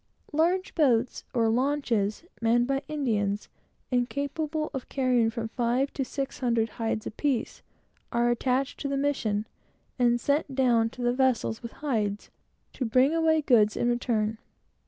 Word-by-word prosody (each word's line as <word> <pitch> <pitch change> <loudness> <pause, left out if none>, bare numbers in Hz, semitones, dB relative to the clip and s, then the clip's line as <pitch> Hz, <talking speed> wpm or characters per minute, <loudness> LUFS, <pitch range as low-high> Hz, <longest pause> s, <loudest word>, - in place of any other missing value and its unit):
Large 350 +5 +1
boats, 255 -6 +2 1.2
manned 235 +1 +3
by 270 +1 0
Indians, 210 -9 -1 0.4
and 245 -1 +1
capable 305 +2 -2
of 265 -3 -5
carrying 250 -4 +2
nearly 225 -1 -2
a 245 +2 +2
thousand 250 -4 -1
hides 225 -1 -3
apiece, 265 +1 -2 0.5
are 240 0 +2
attached 260 +3 0
to - - -3
the 280 0 -1
missions, 230 -7 0 0.5
and 240 -1 +3
sent 280 +1 0
down 240 -4 +3
to 245 +1 -8
the 240 0 +2
vessels 255 -4 +1
with 235 -1 -8
hides, 210 -7 -1 0.4
to - - -3
bring 255 +5 +3
away 320 -1 +3
goods 215 -6 +4
in 240 - +1
return. 225 -3 0
245 Hz, 135 wpm, -27 LUFS, 230-275 Hz, 1.2 s, goods